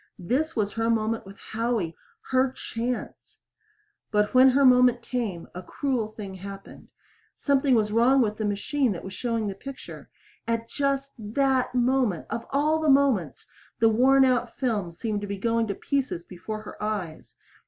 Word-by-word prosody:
This 260 - -1
was 205 -2 -1
her 225 0 0
moment 225 -2 0
with 200 +1 -12
Howie 220 -7 -2 0.4
her 260 0 +3
chance. 240 0 -5 0.7
But 210 -1 +1
when 255 +1 +7
her 275 +2 +4
moment 250 -1 +5
came, 225 -9 -3
a 180 - -6
cruel 245 +3 -2
thing 210 -3 -8
happened. 195 +1 -10 0.5
Something 275 -2 +2
was 210 -2 +1
wrong 240 +5 +4
with 215 -4 +1
the 215 - -2
machine 210 +5 0
that 170 - -7
was 190 - -7
showing 230 +1 -2
the 200 - -2
picture. 270 +7 -10 0.4
At 230 0 -1
just 275 +1 -1
that 255 +4 0
moment 245 -7 +1
of 230 - -4
all 300 +3 +2
the 310 - +2
moments! 270 - +2 0.3
the 225 - +5
worn 265 +4 +5
out 245 -2 0
film 220 -9 -1
seemed 210 +4 -3
to 205 - -5
be 200 0 -4
going 230 +2 0
to 200 - -2
pieces 265 -11 -2
before 215 +5 -7
her 210 - -10
eyes. 205 -7 -4
230 Hz, 165 wpm, -26 LUFS, 205-260 Hz, 0.7 s, when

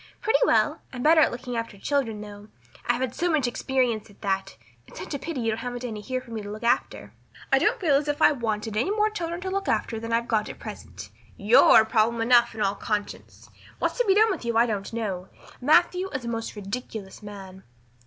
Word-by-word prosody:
"Pretty 465 +3 +2
well. - - +2
I'm 250 -1 -6
better 315 +1 +6
at - - +5
looking 245 0 -6
after 230 -3 -4
children, 225 -2 -1
though. 205 0 -10 0.4
I've 240 +1 +1
had 255 -2 -2
so 350 +5 -1
much 310 -6 +2
experience 240 -3 -1
at 205 - -20
that. 195 - -2 0.3
It's - - -14
such - - -6
a 285 - -3
pity 280 -1 -4
you 225 -1 0
haven't 245 +1 -5
any 215 -3 -5
here 255 +5 -3
for 250 -2 -15
me 225 -1 -4
to 205 - -8
look 215 +2 -7
after." 235 - 0 0.4
"I - - +6
don't - - +1
feel 330 -8 +2
as 295 +1 -2
if 290 +1 -1
I - - +6
wanted 220 -5 -3
any 235 - +1
more 425 +1 +1
children 340 -4 -4
to 375 0 -4
look 390 0 -2
after 225 - -1
than 230 +1 -6
I've 235 +1 +1
got 215 -2 0
at - - -8
present. - - -9 0.3
You're 220 +1 +6
problem 225 +1 +1
enough 235 0 +4
in 220 - -5
all 195 -1 +2
conscience. 205 0 -5 0.3
What's - - -2
to - - +3
be 385 - +5
done 435 +1 +5
with 360 - -4
you 235 -1 -1
I 235 - +5
don't 205 -4 -3
know. 200 -5 -4 0.3
Matthew 350 +7 +3
is 260 -6 -5
a - - -4
most 230 -1 -4
ridiculous 205 0 -7
man." 195 -2 -10
235 Hz, 225 wpm, -25 LUFS, 215-285 Hz, 0.4 s, better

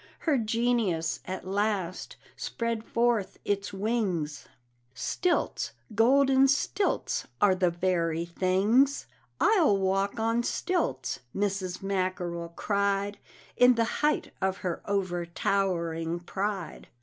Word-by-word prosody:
Her 295 -5 +2
genius, 225 -7 0
at 185 0 -5
last, 195 -2 -2 0.2
spread 230 -1 -3
forth 230 -5 0
its 200 0 -1
wings 190 -8 -2 0.5
Stilts, 340 - -1 0.2
golden 265 +4 +5
stilts, 330 +8 0
are 205 -2 +5
the 185 -1 +2
very 170 -2 0
things 195 +10 +2 0.3
"I'll 345 - +4
walk 195 +2 0
on 230 +1 +1
stilts," 280 - -1 0.2
Mrs. 195 -2 -2
Mackerel 185 -3 -2
cried, 200 0 0 0.4
In 250 0 +6
the 230 0 +2 0.2
height 300 0 +1
of 190 0 0
her 175 -2 -2
overtowering 175 -3 -1
pride. 195 +1 -4
195 Hz, 100 wpm, -28 LUFS, 180-230 Hz, 0.5 s, In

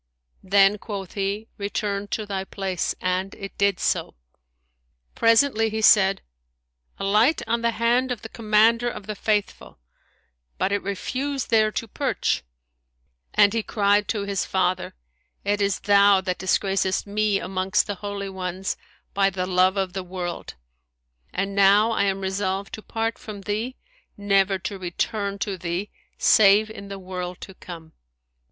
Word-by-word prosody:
Then 195 +1 +4
quoth 195 -4 -6
he, 200 +2 -2
"Return 200 0 -2
to 215 +1 -3
thy 195 -2 -3
place;" 190 -2 -3
and 185 +1 -2
it 195 0 -8
did 200 -2 +2
so. - - -1 1.0
Presently 230 0 +3
he 220 0 -3
said, 195 -3 +5 0.7
"Alight 215 +10 +2
on 235 0 0
the 235 - +2
hand 240 +3 +2
of 240 -3 -4
the 225 - -7
Commander 230 +2 +3
of 205 - -8
the 215 - -4
Faithful;" 210 0 -2 0.8
but 195 - 0
it 205 - 0
refused 265 +8 -3
there 215 -1 +4
to 230 - -3
perch, - - -1 0.9
and 200 0 +5
he 230 - +1
cried 205 -1 +1
to 210 -3 -1
his 200 -2 -1
father, 185 - -1 0.5
"It 205 +1 0
is 200 0 0
thou 200 -1 +5
that 185 -1 -3
disgracest 190 0 0
me 205 0 +1
amongst 185 +1 0
the 205 - -4
Holy[FN#160] 200 -1 -5
Ones, 185 0 -3 0.4
by 195 0 +3
the 185 -1 -3
love 185 +1 +2
of 190 -2 -1
the 190 - -3
world; 180 -1 -6 0.8
and 195 +1 -2
now 200 +3 +5
I 200 -3 +1
am 195 0 -1
resolved 190 0 -2
to 215 - -6
part 225 +1 -3
from 210 -2 -8
thee, 215 +6 -3 0.4
never 195 -1 +2
to 195 +1 -6
return 200 +3 -2
to 195 -2 -3
thee, 175 +4 -3 0.3
save 215 +1 +5
in 200 -2 -9
the 195 0 -6
world 180 -1 -6
to 190 - -9
come." 165 -3 -11
200 Hz, 150 wpm, -24 LUFS, 190-215 Hz, 1.0 s, said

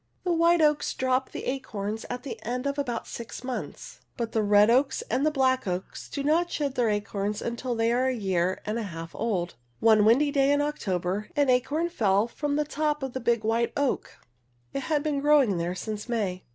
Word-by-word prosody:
The 355 - +1
white 335 0 +4
oaks 300 -1 +2
drop 260 0 0
the - - -7
acorns 220 -5 -4
at 245 0 -5
the 230 -5 -7
end 250 +3 -3
of 280 0 -1
about 240 -5 -2
six 235 +1 -8
months, 255 -1 -6 0.2
but 230 -2 -2
the 220 - +1
red 205 +1 +5
oaks 265 +3 +2
and 275 +6 +2
black 260 -4 +1
oaks 180 +1 -4
do 280 - -4
not 330 +4 +2
shed 285 -5 -2
their 245 -4 +1
acorns 205 0 -2
until 235 +1 -3
they 225 0 +2
are 255 +2 +2
a 260 - 0
year 185 -4 0
and 215 +2 -2
a 210 -4 -4
half 165 0 -8
old. 190 -6 -2 0.3
One 220 -2 +5
windy 260 +7 +4
day 275 -1 +3
in 285 - +3
October, 200 - -2
an 285 -3 +3
acorn 280 +7 +1
fell 210 - +2
from 285 +4 -2
the 300 0 +1
top 300 -1 -1
of 265 -2 -4
a - - -1
big 235 -2 +1
white 230 +1 +1
oak. 285 -2 -1 0.6
It - - -1
had 295 -2 +1
been 300 -2 0
growing 280 -11 +4
there 175 +2 -2
since 210 +4 -5
May. 200 -6 -2
245 Hz, 205 wpm, -27 LUFS, 210-285 Hz, 0.6 s, red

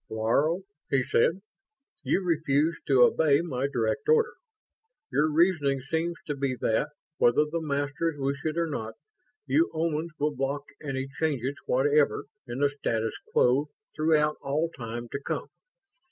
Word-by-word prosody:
"Laro," 140 - +1 0.3
he 135 -1 +2
said, 165 +11 +2 0.6
"you 195 - 0
refused 160 -1 +1
to 130 -3 +6
obey 150 +2 +4
my 140 -6 -2
direct 115 -5 -1
order. 460 0 +4 0.8
Your 155 +2 +2
reasoning 150 -4 +3
seems 170 +1 0
to 150 - -2
be 135 -2 -1
that, 110 - +1 0.3
whether 120 +5 +4
the 165 +2 -3
Masters 145 +2 -1
wish 140 0 -2
it 155 +1 -2
or 170 - +2
not, 110 -8 -4 0.5
you 330 +3 +3
Omans 160 0 -1
will 150 +1 0
block 135 +2 -2 0.2
any 135 -2 -3
changes 140 -4 0
whatever 145 +3 +2 0.2
in 120 +3 -4
the 145 - +4
status 115 -6 -2 0.2
quo 135 +4 +3 0.3
throughout 155 -1 +2
all 155 +4 -1
time 120 -2 -6
to 140 - -4
come. - - -3
145 Hz, 145 wpm, -27 LUFS, 135-160 Hz, 0.8 s, to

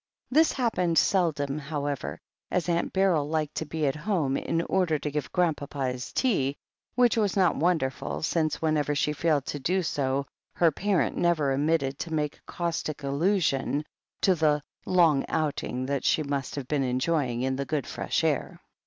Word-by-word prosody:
This 315 +4 +4
happened 180 -10 0
seldom, 155 -6 +2
how 145 -1 -4
ever, 140 - -3 0.3
as 180 - 0
Aunt 170 -1 0
Beryl 180 -7 +2
liked 155 -2 -1
to 160 - -2
be 155 0 -2
at 135 - +1
home, 150 -5 0
in 165 +4 -1
order 175 -5 +1
to 150 0 -4
give 145 -3 -3
Grandpapa 145 -6 0
his 125 0 -6
tea 145 - +1 0.2
— - - -52
^which 245 -2 +4
was 205 -3 +1
not 185 -3 +4
wonderful, 130 - 0
since 155 - 0
whenever 150 -2 +1
she 150 +1 +1
failed 150 -2 +1
to 145 - -4
do 185 +7 0
so 140 -3 -1 0.3
her 170 -2 +4
parent 200 +3 0
never 160 -5 +2
omitted 140 -1 +1
to 165 - -4
make 150 -1 -2
caustic 165 -4 -3
allusion 145 -1 +1 0.4
to 190 - +5
the 150 -3 +2 0.2
"long 165 -7 +4
outing 140 -4 -1
that 140 0 -1
she 155 - +2
must 140 -2 -3
have 140 -3 -5
been 145 -1 0
enjoying 130 -1 0
in 130 0 0
the 140 +1 -3
good 145 -2 -2
fresh - - -2
air." - - -1
150 Hz, 175 wpm, -27 LUFS, 140-170 Hz, 0.4 s, to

